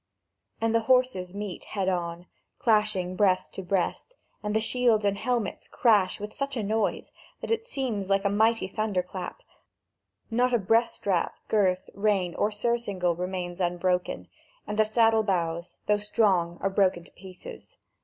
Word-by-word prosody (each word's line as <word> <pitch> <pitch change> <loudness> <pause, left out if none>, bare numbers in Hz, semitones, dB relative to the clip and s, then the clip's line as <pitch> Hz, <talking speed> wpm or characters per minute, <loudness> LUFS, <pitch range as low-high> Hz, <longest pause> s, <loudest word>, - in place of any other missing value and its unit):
And 225 0 +1
the 230 - +4
horses 250 -8 +2
meet 205 -3 -5
head 195 -2 -3
on, 175 -1 -2 0.3
clashing 210 -5 +1
breast 185 -2 +2
to - - -5
breast, 190 - -2 0.3
and 210 0 -2
the - - +4
shields 225 -2 +2
and 200 0 +2
helmets 225 -1 -2
crash 210 -6 +3
with 210 +1 -6
such 275 -1 -3
a 225 - -1
noise 215 +1 -1 0.3
that - - -4
it 455 +1 0
seems 235 - -3
like 195 0 +2
a - - +4
mighty 220 0 +2
thunder 200 -2 -1
clap; 180 0 -7 0.9
not 245 +2 +2
a - - +5
breast 230 +3 +2
strap, 185 -4 -1
girth, 190 -3 +2
rein 200 -4 +1
or 205 - +1
surcingle 205 -5 -1
remains 180 0 -4
unbroken, 180 +1 -1 0.4
and 210 - -4
the 215 - +6
saddle 225 0 +4
bows, 170 -4 -2
though 210 0 +3
strong, 190 -5 +1
are 195 - 0
broken 185 -3 +2
to - - -19
pieces. 185 -1 -12
200 Hz, 160 wpm, -27 LUFS, 185-225 Hz, 0.9 s, the